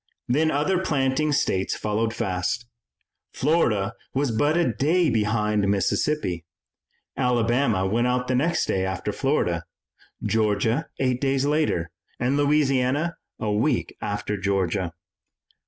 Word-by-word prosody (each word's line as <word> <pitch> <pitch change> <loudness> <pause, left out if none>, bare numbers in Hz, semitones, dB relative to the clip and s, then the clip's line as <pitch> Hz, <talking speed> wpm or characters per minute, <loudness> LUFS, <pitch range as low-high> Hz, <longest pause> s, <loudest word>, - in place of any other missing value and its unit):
Then 155 +6 +2
other 155 +6 +1
planting 150 -3 +1
states 95 -9 +1
followed 110 +1 -1
fast. 95 +3 -2 0.7
Florida 115 -9 +1 0.2
was 135 -2 +1
but 145 +8 +2
a 175 - +2
day 160 +2 +2
behind 105 -2 +1
Mississippi, 100 - 0 0.7
Alabama 120 -4 +1
went 115 +5 +1
out 125 0 0
the 130 - 0
next 155 +7 +1
day 95 - 0
after 95 +2 -2
Florida, 100 - 0 0.6
Georgia 110 +6 +1
eight 130 -2 0
days 135 -1 +1
later, 145 - 0 0.3
and 125 +3 +1
Louisiana 145 +1 +2 0.2
a 105 - -1
week 110 +9 0
after 105 0 -2
Georgia. 95 -2 0
120 Hz, 120 wpm, -24 LUFS, 105-145 Hz, 0.7 s, Then